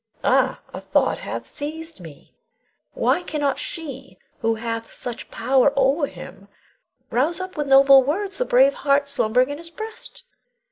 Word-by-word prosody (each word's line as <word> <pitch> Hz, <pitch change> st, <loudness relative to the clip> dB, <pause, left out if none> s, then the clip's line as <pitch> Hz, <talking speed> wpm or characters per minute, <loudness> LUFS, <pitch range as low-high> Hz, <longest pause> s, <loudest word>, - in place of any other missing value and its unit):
Ah, -, -, +2 dB
a -, -, -6 dB
thought -, -, +1 dB
hath -, -, -6 dB
seized 320 Hz, +1 st, -6 dB
me! 160 Hz, -5 st, -13 dB, 0.6 s
Why -, -, +1 dB
cannot 295 Hz, -5 st, -2 dB
she 305 Hz, -, -7 dB, 0.2 s
who 225 Hz, -3 st, 0 dB
hath 230 Hz, 0 st, -4 dB
such 245 Hz, -2 st, -6 dB
power 265 Hz, +1 st, +2 dB
o'er 280 Hz, +2 st, +2 dB
him 195 Hz, -4 st, -12 dB, 0.6 s
rouse 280 Hz, +10 st, +1 dB
up 370 Hz, 0 st, -6 dB
with 295 Hz, -1 st, -2 dB
noble 275 Hz, 0 st, +7 dB
words 385 Hz, -, -2 dB
the -, -, +1 dB
brave 270 Hz, -, +4 dB
heart 280 Hz, 0 st, +1 dB
slumbering 250 Hz, 0 st, +2 dB
in 290 Hz, -, -6 dB
his 335 Hz, 0 st, -9 dB
breast? 440 Hz, +6 st, -8 dB
275 Hz, 150 wpm, -22 LUFS, 250-320 Hz, 0.6 s, noble